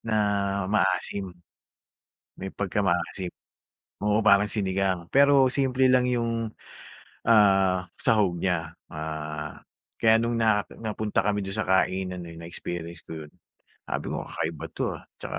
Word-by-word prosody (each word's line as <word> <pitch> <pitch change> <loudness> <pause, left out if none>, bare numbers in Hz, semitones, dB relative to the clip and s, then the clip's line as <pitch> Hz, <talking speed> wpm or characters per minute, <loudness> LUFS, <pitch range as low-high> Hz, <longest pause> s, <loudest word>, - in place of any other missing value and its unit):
na 110 -1 -2 0.5
maasim, 100 -1 0 1.1
may 95 0 -6
pagka-maasim. 95 -2 -1 0.7
Oo, 105 +1 +3
parang 105 -1 +4
sinigang, 95 -3 0
pero 140 +1 +5
simple 130 0 +2
lang 130 0 +4
yung 115 -2 -1 0.8
ah, 95 -4 +4
sahog 100 -6 +2
niya. 85 -2 -1 0.2
Ah, 75 -1 -6 0.3
kaya 110 0 +5
nung 115 0 0
na 110 -2 +3 0.2
napunta 110 -2 -3
kami 105 +1 +1
do'n 95 +1 -5
sa - - 0
kainan 95 -1 +1
na 85 - -9
yun 85 - -10
na-experience 85 -1 -6
ko 80 -2 -7
yun, 75 - -21 0.5
sabi - - -3
ko, - - -3
"Kakaiba 80 -1 -4
'to - - -4 0.2
ah." - - -16 0.2
'Tsaka - - -4
95 Hz, 135 wpm, -26 LUFS, 85-110 Hz, 1.1 s, pero